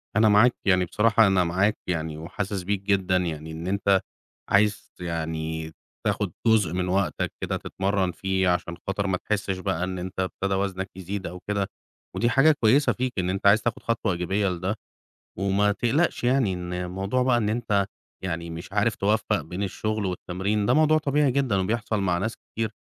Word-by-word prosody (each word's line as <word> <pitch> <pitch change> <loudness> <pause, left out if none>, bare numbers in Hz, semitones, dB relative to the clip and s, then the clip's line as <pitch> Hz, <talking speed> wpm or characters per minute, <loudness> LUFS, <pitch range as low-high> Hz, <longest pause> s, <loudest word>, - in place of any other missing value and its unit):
أنا 110 0 +5
معاك، 110 +4 +5
يعني 95 -2 +4
بصراحة 110 +4 +4
أنا 95 -2 +3
معاك 95 +5 +1
يعني، 80 -3 -2
وحاسس 95 +4 -4
بيك 100 +1 -1
جدًا 95 -2 +2
يعني 80 -3 -3
إن 80 +3 -6
أنت 100 -1 +2 0.5
عايز 105 +1 +2
ت - - -15
يعني 80 -1 -3 0.3
تاخد - - 0 0.2
جزء 105 -7 +4
من 90 0 -1
وقتك 95 0 0
كده - - -1
تتمرّن 95 -1 -1
فيه 95 0 0
عشان 90 -1 -1
خاطر 100 +1 -1
ما 95 -1 +1
تحسّش 100 -2 -2
بقى 85 -1 -1
إن 90 0 -3
أنت 90 +1 -6
ابتدى 95 +1 -1
وزنك 95 0 -2
يزيد 95 +1 -5
أو 90 +2 -7
كده. 100 -2 0 0.5
ودي 120 - +2
حاجة 135 +6 +5
كويسة 135 +7 +5
فيك 130 0 -2
إن 90 0 0
أنت 95 +1 +1
عايز 105 +2 +6
تاخد 120 -2 -2
خطوة 115 -4 0
إيجابية 95 +3 0
لده. 90 +3 -2 0.6
وما 100 +1 +2
تقلقش 130 +9 +1
يعني 125 -5 +3
إن 90 -1 -5
الموضوع 95 +7 -1
بقى 125 -1 +3
إن 110 -3 +1
أنت 105 -3 +1 0.4
يعني 85 -2 -3
مش 85 +3 -8
عارف 105 +2 +2
تُوفَّق 105 +1 +1
بين 90 +3 -5
الشغل 105 +1 -2
والتمرين، 95 +3 -1
ده - - +4
موضوع 155 0 +5
طبيعي 145 -1 +2
جدًا 130 -6 +1
وبيحصَل 110 +2 -1
مع 90 -3 +1
ناس 110 +5 -2
كتير، 110 -1 -4
100 Hz, 180 wpm, -25 LUFS, 90-110 Hz, 0.6 s, عايز